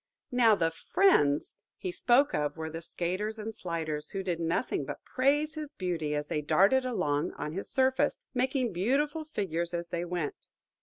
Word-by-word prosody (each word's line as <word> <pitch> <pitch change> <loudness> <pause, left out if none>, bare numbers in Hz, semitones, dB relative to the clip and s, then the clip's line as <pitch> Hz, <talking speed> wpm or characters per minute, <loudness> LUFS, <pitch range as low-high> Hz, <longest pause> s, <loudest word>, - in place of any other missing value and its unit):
Now 235 -3 +5
the 165 -4 +1
"friends" 160 - +3 0.2
he 370 - -4
spoke 275 -2 +3
of 150 +1 -1
were 160 0 -4
the 165 +1 -6
skaters 185 +6 -2
and 220 +1 -5
sliders, 165 -6 -4
who 195 -1 -4
did 175 -3 -2
nothing 165 +8 0
but - - -7
praise 290 +4 +2
his 305 -2 -6
beauty 165 - -2
as 150 0 -1
they 150 - -1
darted 195 - +4
along 150 -12 0
on 150 - -4
his 195 - -4
surface, 260 0 +1
making 255 -3 0
beautiful 285 - 0
figures 175 - -2
as 170 0 -4
they 170 0 -2
went. 175 -4 -4
185 Hz, 170 wpm, -30 LUFS, 165-260 Hz, 0.2 s, Now